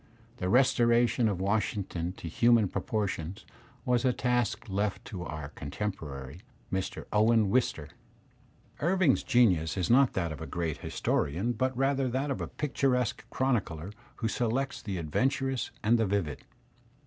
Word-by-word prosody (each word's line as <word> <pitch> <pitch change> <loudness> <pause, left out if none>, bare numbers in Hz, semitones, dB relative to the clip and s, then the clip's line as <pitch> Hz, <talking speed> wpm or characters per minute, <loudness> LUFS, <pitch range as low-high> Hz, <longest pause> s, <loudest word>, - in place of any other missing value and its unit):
The 90 - -2
restoration 120 0 +4
of 95 -3 -2
Washington 95 -3 -1
to 85 - -8
human 115 +5 +4
proportions 100 -7 -3 0.4
was 125 0 +2
a 130 - +4
task 120 -3 0
left 100 0 -2
to 95 -4 -6
our 75 -4 -6
contemporary, 75 -3 -6 0.3
Mr. 95 -1 -3
Owen 110 -1 +4
Wister. 105 - 0 0.9
Irving's 175 -3 +3
genius 95 -9 +3
is 90 +1 0
not 135 +1 +5
that 85 -5 -1
of 80 - -7
a 80 - -5
great 85 -3 -2
historian 90 +12 -1
but 130 +2 -1
rather 135 0 +2
that 135 +4 -1
of 135 - -3
a - - -3
picturesque 130 -6 0
chronicler 100 -11 -1 0.2
who 115 - -2
selects 125 +4 -1
the 100 -3 -4
adventurous 130 - 0
and 115 +3 +4
the 110 - +2
vivid. 95 -8 -2
110 Hz, 140 wpm, -29 LUFS, 90-125 Hz, 0.9 s, not